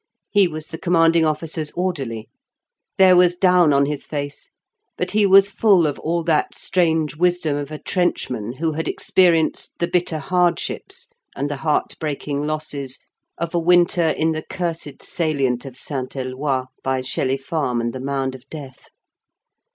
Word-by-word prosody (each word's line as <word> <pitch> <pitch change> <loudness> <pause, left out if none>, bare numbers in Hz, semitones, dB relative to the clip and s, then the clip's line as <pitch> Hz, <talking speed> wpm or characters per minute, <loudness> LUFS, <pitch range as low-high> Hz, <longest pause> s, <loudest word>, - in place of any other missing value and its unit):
He 200 -3 +5
was 155 -2 -6
the 160 - -7
Commanding 165 -2 +3
Officer's 155 0 -2
orderly. 135 -12 -3 0.7
There 185 -1 +7
was 180 0 +5
down 180 -3 +4
on 140 0 +4
his 145 0 -3
face 145 -1 -6 0.5
but - - -2
he 210 -1 +3
was 195 +1 +6
full 195 -6 +4
of 145 - -2
all 170 +1 -1
that 160 -2 +1
strange 160 -4 +1
wisdom 175 -2 +1
of 145 0 -4
a 155 - -6
trenchman 125 - -1
who 160 +4 -1
had 160 +1 -3
experienced 170 -4 +2
the 170 - 0
bitter 175 -2 0
hardships 180 - -1 0.3
and 145 +2 -2
the 145 - -3
heartbreaking 150 -1 -2
losses 145 -3 -3 0.4
of 170 +1 -4
a 175 - +2
winter 175 -1 +3
in 160 +1 +1
the 155 0 -3
cursed 165 -6 -5
salient 140 -6 -1
of 130 -2 -7
St. 135 -2 -4
Eloi, 130 0 -2 0.2
by 130 -1 0
Shelley 130 +1 0
Farm 135 -4 -2
and 120 0 -2
The 130 - -6
Mound 135 0 -2
of 130 +1 -13
Death. 140 -5 -10
155 Hz, 160 wpm, -21 LUFS, 140-175 Hz, 0.7 s, There